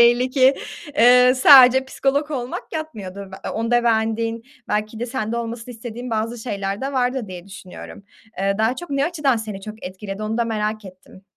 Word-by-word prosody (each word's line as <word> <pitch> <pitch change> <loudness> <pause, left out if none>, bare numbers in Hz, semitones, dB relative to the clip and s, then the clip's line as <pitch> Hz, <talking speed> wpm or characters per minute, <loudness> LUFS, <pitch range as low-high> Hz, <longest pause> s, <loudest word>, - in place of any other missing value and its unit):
belli 240 +2 +4
ki, 265 0 +4 0.4
eee, 250 +2 +7
sadece 260 -1 +8
psikolog 280 +2 -1
olmak 255 -4 -5
yatmıyordur. 200 - -6 0.2
A - - -3
onda 240 +1 +1
beğendiğin 225 0 0 0.3
belki 215 +1 -2
de 240 - -2
sende 235 -2 -3
olmasını 235 +1 -5
istediğin 240 +2 -7
bazı 225 +2 -2
şeyler 200 -3 -4
de 270 +1 -3
vardır, 250 -3 -1
diye 180 -1 -9
düşünüyorum. 190 0 -11 0.4
Eee, 195 +1 0
daha 225 +4 +1
çok, 350 -2 -8
ne 275 0 +1
açıdan 295 -6 +1
seni 215 -3 -6
çok 215 +2 -9
etkiledi 195 +2 -7
onu 220 +2 -2
da 235 - +2
merak 215 -1 -2
ettim. 185 0 -14
230 Hz, 175 wpm, -21 LUFS, 215-255 Hz, 0.4 s, sadece